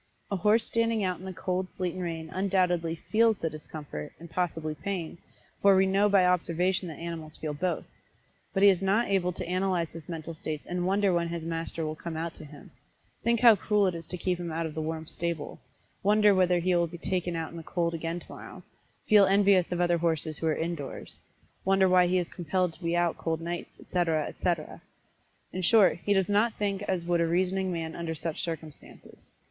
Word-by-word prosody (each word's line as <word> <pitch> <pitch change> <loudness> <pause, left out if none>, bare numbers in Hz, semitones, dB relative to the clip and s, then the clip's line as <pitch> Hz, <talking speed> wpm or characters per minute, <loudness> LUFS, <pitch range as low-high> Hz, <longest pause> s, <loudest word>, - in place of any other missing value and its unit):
A - - +1
horse 210 +5 +3
standing 230 -2 +1
out 185 -2 -1
in 185 - -10
the 190 - -4
cold 185 +1 -2
sleet 180 -2 -1
and 185 - -5
rain 165 -2 -4
undoubtedly 180 -3 +1
feels 220 +6 +2
the 165 -3 -2
discomfort, 150 - -7
and 170 0 -11
possibly 165 -3 -2
pain, 170 +1 -5 0.4
for 200 -1 +6
we 190 0 +5
know 195 +2 +3
by 195 -2 +5
observation 180 +1 +1
that 160 - -7
animals 165 -2 -6
feel 155 -1 -4
both. 175 +5 -2 0.7
But 195 - +1
he 200 - +9
is 190 -2 +2
not 200 +5 +2
able 180 -2 +2
to 180 - -5
analyze 180 -2 0
his 165 -1 -10
mental 165 -1 -5
states 155 -1 -5
and 180 0 -2
wonder 195 0 +2
when 170 -1 +1
his 170 -1 -4
master 165 0 -3
will 155 - -2
come 160 0 -6
out 165 +1 -3
to - - -10
him 145 -1 -13 0.5
think 235 0 +2
how 235 -3 +9
cruel 205 +1 +2
it 185 - +1
is 165 -1 -7
to 180 - -5
keep 180 0 -1
him 170 -2 -4
out 165 +1 -2
of 160 - -5
the 160 - -3
warm 160 0 -4
stable 170 -2 -4 0.4
wonder 210 +1 +5
whether 180 -1 +3
he 180 +1 +1
will 170 -1 +2
be 170 +1 -9
taken 175 -1 -2
out 165 -1 -3
in 170 - -9
the - - -6
cold 170 +1 -1
again 165 +1 -3
tomorrow - - -11 0.4
feel 205 -2 +6
envious 195 -2 +4
of 175 - -1
other 175 -1 +2
horses 160 -2 -1
who 165 - -1
are 155 - +2
indoors 165 -4 -5 0.4
wonder 190 0 +4
why 180 -1 +5
he 185 +1 +2
is 175 -2 0
compelled 180 +1 -1
to 160 - -14
be 170 +1 0
out 175 -1 +1
cold 160 -1 -1
nights, 170 +1 -6
etc., 165 -4 0
etc., 170 -4 -3 0.7
in 185 - -3
short, 190 -1 +5
he 205 - -1
does 190 -1 +2
not 210 +3 +2
think 200 -2 -1
as 180 -3 -1
would 175 -1 +2
a 165 - +2
reasoning 185 +2 0
man 165 -2 -4
under 165 -1 -4
such 160 +2 -4
circumstances. 160 -4 -8
175 Hz, 215 wpm, -28 LUFS, 165-190 Hz, 0.7 s, he